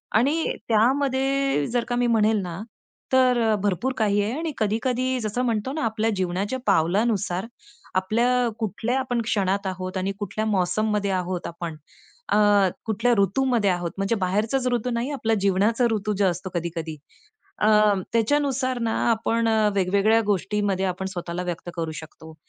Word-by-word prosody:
आणि 285 +9 +2 0.2
त्यामध्ये 270 - +2
जर 245 -1 +1
का 245 - 0
मी 245 0 +1
म्हणेल 220 -2 +3
ना 175 -2 -6 0.5
तर 255 -2 +4
अ, 215 - +3
भरपूर 205 +7 0
काही 205 -3 +2
आहे 230 +7 -2
आणि 325 -1 -2
कधी-कधी 250 +4 0
जसं 215 +2 -2
म्हणतो 230 +1 -1
ना 310 0 -2
आपल्या 220 0 0
जीवनाच्या 190 +6 -2
पावलानुसार 195 +1 +1 0.5
आपल्या 235 +6 +2
कुठल्या 225 +4 -1
आपण 250 -2 -1
क्षणात 200 -3 0
आहोत 185 0 -4
आणि 190 +1 -1
कुठल्या 205 +2 -3
मौसममध्ये 210 +1 0
आहोत 180 -1 -2
आपण. 170 -1 -6 0.6
अ, - - +4 0.5
कुठल्या 230 +2 +1
ऋतूमध्ये 220 +1 +2
आहोत. 175 -2 -1
म्हणजे 195 +4 0
बाहेरचाच 215 +7 0
ऋतू 245 0 0
नाही, 235 +2 -2
आपला 225 -5 -1
जीवनाचा 200 +5 +2
ऋतू 215 -1 -1
जो 200 - +2
असतो 185 0 -1
कधी-कधी. 165 -2 -4 0.6
अ, 210 - +1 0.5
त्याच्यानुसार 255 +1 +1
ना 225 -1 0 0.2
आपण 230 +1 0
अ, 220 -1 +3
वेगवेगळ्या 200 +4 +3
गोष्टीमध्ये 200 -1 0
आपण 185 0 -3
स्वतःला 175 0 -4
व्यक्त 175 0 -5
करू 165 -2 -3
शकतो. 160 0 -13
215 Hz, 150 wpm, -24 LUFS, 190-240 Hz, 0.6 s, तर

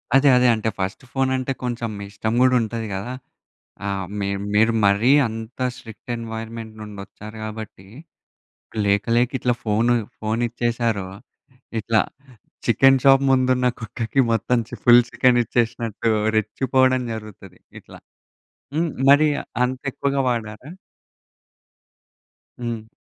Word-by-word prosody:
అదే 140 +1 +6
అదే 125 0 +4
అంటే 110 0 -1
ఫస్ట్ 95 +6 -3
ఫోనంటే 130 0 0
కొంచెం 120 -2 -2
మీ - - -6
ఇష్టం 110 +2 -3
గూడా 130 0 +5
ఉంటది 115 0 -4
కదా! 100 +6 -4 0.7
ఆ! - - -1 0.3
మీర్ 100 0 -2 0.2
మీరు 110 +2 +4
మరీ 100 +6 +4 0.2
అంత 115 +2 -8 0.2
స్ట్రిక్ట్ 120 -2 -13
ఎన్‌వైర్‌మెంట్ 115 -1 -7
నుండి 105 -2 -9
వచ్చారు 105 +2 -11
గాబట్టి, 110 -3 -8 1.0
లేక 100 0 +2
లేక 120 +1 +3
ఇట్లా 125 - +1
ఫోను, 115 +2 +2 0.3
ఫోనిచ్చేసారో 115 -2 -1 0.7
ఇట్లా 110 0 +2 0.7
చికెన్ 135 0 +5
షాప్ 135 0 +6
ముందున్న 130 -1 +3
కుక్కకి 115 +3 -1
మొత్తం 120 +2 +1
చి - - -8
ఫుల్ 120 0 +8
చికెన్ 125 -2 +3
ఇచ్చేసినట్టు 115 -1 -1 0.3
రెచ్చిపోవడం 130 +4 +2
జరుగుతది 105 -4 -10 0.2
ఇట్ల. - - -17 0.8
హ్మ్, 165 +1 +1 0.2
మరి 150 +2 +6 0.4
అంతెక్కువగా 135 +2 -2
వాడారా? 115 +2 -4 1.9
హ్మ్. 115 -2 -4
115 Hz, 115 wpm, -22 LUFS, 110-125 Hz, 1.9 s, ఫుల్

